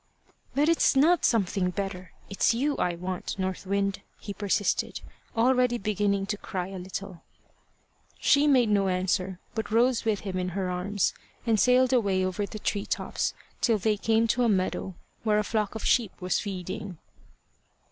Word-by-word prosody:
"But 290 +2 +3
it's 335 -3 +3
not 320 +6 +4
something 195 -4 +1
better 185 -2 -5 0.2
it's 200 +3 +1
you 285 +4 0
I 175 -1 0
want, 180 +2 -4
North 190 0 -3
Wind," 200 0 0 0.2
he 200 - -6
persisted, 205 0 0 0.4
already 250 0 +3
beginning 200 -2 0
to 205 +1 -3
cry 185 -3 -4
a 195 -1 -7
little. 185 -1 -7 1.0
She 290 +1 +4
made 255 -6 +4
no 200 -2 +3
answer, 185 0 -1
but 220 -1 -3
rose 235 +2 +3
with 220 -3 0
him 190 -2 -3
in 180 0 -1
her 185 -2 -1
arms 185 +2 0 0.3
and 225 -3 +2
sailed 255 +2 +4
away 195 -6 +2
over 195 +2 -2
the 215 - -7
tree 205 -1 -2
tops - - -2 0.3
till 230 -3 +3
they 210 +1 +1
came 225 +2 +2
to 245 - +2
a 235 - +3
meadow, 190 -1 -1 0.3
where 215 -2 +2
a 210 - +2
flock 210 -1 -1
of 220 - -5
sheep 230 -6 +1
was 180 -1 0
feeding. 190 -1 -5
205 Hz, 165 wpm, -27 LUFS, 185-225 Hz, 1.0 s, not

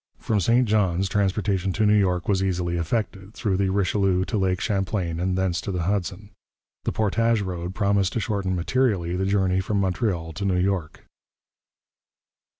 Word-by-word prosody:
From 105 - 0
St 120 +6 +3
Johns 95 -3 +1
transportation 100 -1 0
to 110 +2 +1
New 105 - +4
York 90 -4 +2
was 95 -2 +2
easily 90 -2 -1
effected, 95 +3 -3
through 100 -4 -1
the 95 0 +1
Richelieu 95 -1 +1
to 115 - -3
Lake 95 -1 +1
Champlain 95 -5 -1
and 90 +1 0
thence 95 -2 0
to 100 - -4
the 90 -2 -2
Hudson. 100 +2 -2 0.5
This - - -2
portage 115 +1 +2
road 90 -1 -5
promised 100 -1 +1
to 115 - 0
shorten 100 -5 -1
materially 90 -2 0
the 95 +1 -1
journey 95 -2 +2
from 100 +2 -1
Montreal 90 -4 -1
to 105 - -5
New 95 -2 +1
York. 90 -4 -1
95 Hz, 165 wpm, -24 LUFS, 90-105 Hz, 0.5 s, New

